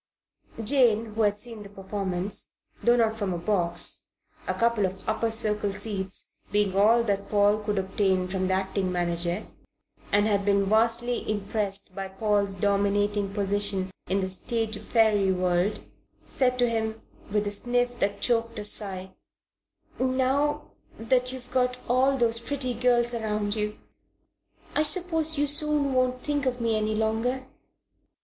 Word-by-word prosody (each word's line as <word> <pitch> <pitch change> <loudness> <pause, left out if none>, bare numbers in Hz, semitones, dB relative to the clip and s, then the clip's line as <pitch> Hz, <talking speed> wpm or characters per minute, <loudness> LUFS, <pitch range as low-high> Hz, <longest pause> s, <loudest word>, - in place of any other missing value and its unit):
Jane, 230 -3 +3
who 225 - -1
had 205 -1 +1
seen 230 -1 -4
the 200 - -10
performance, 195 -1 -3 0.3
though 240 0 +4
not 225 -2 +2
from 195 -3 -1
a - - -3
box, 175 -2 -2 0.5
a - - 0
couple 230 -4 +2
of 190 +1 -10
upper 220 +1 0
circle 210 -2 +3
seats 195 -2 -5
being 205 -2 +1
all 225 +4 +4
that 200 -3 -2
Paul 205 0 +3
could 210 -1 -3
obtain 190 -1 0
from 185 0 -2
the 190 - +1
acting 190 0 -1
manager, 175 +2 -1 0.7
and 205 0 +3
had 200 -2 +1
been 200 0 +2
vastly 230 +4 +2
impressed 200 -2 -2
by 195 0 -5
Paul's 200 0 0
dominating 205 +1 0
position 200 -1 0 0.2
in 195 +1 +1
the 190 - -2
stage 220 +2 -2
fairy 210 -3 +2
world, 180 +2 0 0.4
said 250 -1 +1
to 245 -1 +3
him, 220 -1 -2 0.3
with 210 0 +1
a 205 - -2
sniff 245 +3 +2
that 200 0 -1
choked 230 -1 +1
a 210 - -4
sigh: 190 -3 +3 0.9
"Now 265 +3 0 0.3
that 250 +2 +1
you've 250 -1 -9
got 250 -1 +1
all 260 +3 +2
those 230 -2 +1
pretty 255 0 -2
girls 240 0 +2
around 210 -2 -2
you, 210 0 -3 1.0
I - - +2
suppose 320 -1 +1
you 290 - +2
soon 295 -1 +1
won't 255 0 0
think 290 -2 0
of 250 -1 -1
me 230 -1 0
any 215 0 -1
longer?" 225 +4 -1
215 Hz, 150 wpm, -26 LUFS, 200-245 Hz, 1.0 s, though